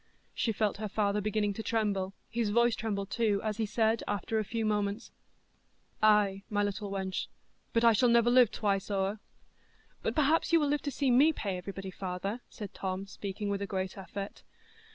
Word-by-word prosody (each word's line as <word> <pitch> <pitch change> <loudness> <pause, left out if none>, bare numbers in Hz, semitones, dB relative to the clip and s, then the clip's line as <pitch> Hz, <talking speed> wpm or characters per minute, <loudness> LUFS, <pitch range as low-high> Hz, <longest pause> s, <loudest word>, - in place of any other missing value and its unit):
She 230 - 0
felt 210 -2 0
her 215 0 -4
father 210 0 +1
beginning 210 0 0
to 220 - -5
tremble; 200 -4 -1
his 230 -2 -1
voice 235 +2 +3
trembled 205 -3 -3
too, 215 -4 +2
as 215 -1 -2
he 220 -2 0
said, 220 +1 +1
after 205 +2 -1
a - - 0
few 225 +2 -2
moments: 210 +1 -1 0.9
"Ay, 210 -2 +4
my 205 -1 +1
little 205 0 -3
wench, 190 -1 -3 0.4
but 230 - +2
I 230 -1 +7
shall 245 +3 +4
never 235 0 +5
live 250 -3 +6
twice 200 -3 -1
o'er." 200 +1 -1 0.8
"But - - -2
perhaps 310 +2 +3
you 335 - +6
will 295 -2 +1
live 295 0 +1
to 285 - -3
see 270 0 +1
me 280 +6 +6
pay 200 -9 -3
everybody, 190 +1 -6
father," 190 +5 -4
said 210 -3 -8
Tom, 190 0 -3
speaking 200 +1 -5
with 200 0 -1
a 200 - -2
great 190 -1 -3
effort. 195 +1 -7
210 Hz, 190 wpm, -31 LUFS, 195-230 Hz, 0.9 s, I